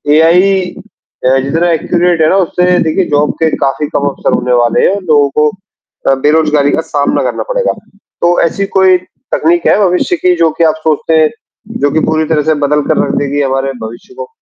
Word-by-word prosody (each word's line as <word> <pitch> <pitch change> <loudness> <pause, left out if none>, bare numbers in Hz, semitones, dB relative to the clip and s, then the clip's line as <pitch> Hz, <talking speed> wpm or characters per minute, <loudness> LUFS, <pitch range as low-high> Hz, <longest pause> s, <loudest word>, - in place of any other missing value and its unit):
AI 180 +5 +3 0.6
अ, 130 +1 +3
जितना 160 +6 -1
accurate 170 +1 0
है 155 - +3
ना, - - +2
उससे 180 0 +1
देखिए 160 +3 0
जॉब 145 0 +1
के 160 - +3
काफ़ी 140 +2 -1
कम 145 0 -2
अवसर 140 - -2
होने 125 0 -1
वाले 120 -1 +2
हैं, 195 - 0
उन 200 - -8
लोगों 145 -3 +3
को 150 0 +3 0.6
अ, 135 - +4
बेरोज़गारी 150 -2 +2
का 160 - 0
सामना 145 -1 0
करना - - -3
पड़ेगा। - - 0 0.5
तो 175 +1 +2
ऐसी 195 +4 -1
कोई 185 -1 +5 0.4
तकनीक 170 +2 +1
है - - +4
भविष्य 180 - 0
की 180 - +1
जो 165 -2 +2
कि 170 - +2
आप 160 - +2
सोचते 160 +1 +1
हैं, 155 - +3 0.5
जो 145 0 +2
कि 160 - +1
पूरी 160 0 0
तरह 155 -2 +1
से - - +1
बदल 150 +1 +1
कर - - +1
रख - - -2
देगी 145 0 -1
हमारे 135 0 -1
भविष्य 115 - -10
को? 470 +3 -7
160 Hz, 205 wpm, -11 LUFS, 145-175 Hz, 0.6 s, कोई